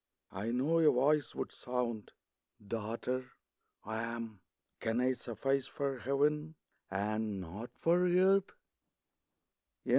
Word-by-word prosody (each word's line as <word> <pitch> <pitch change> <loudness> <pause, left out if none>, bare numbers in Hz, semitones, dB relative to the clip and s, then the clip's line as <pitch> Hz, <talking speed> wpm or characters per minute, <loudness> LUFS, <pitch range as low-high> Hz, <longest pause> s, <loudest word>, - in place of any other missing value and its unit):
I 100 +4 -3
know 135 +8 +2
a 160 -2 +7
Voice 140 +1 +2
would - - -3
sound, 120 -4 -3 0.3
" 105 - -24
Daughter, 120 +4 -3 0.5
I 110 +1 -2
AM. 115 -2 -4 0.4
Can 115 +1 0
I 130 +1 +3
suffice 130 +3 -1
for 135 -2 -2
Heaven, 150 +4 +1 0.3
and 105 +1 -1
not 95 +7 -6
for 175 +2 +3
earth 190 +2 +4
125 Hz, 115 wpm, -34 LUFS, 110-145 Hz, 0.5 s, a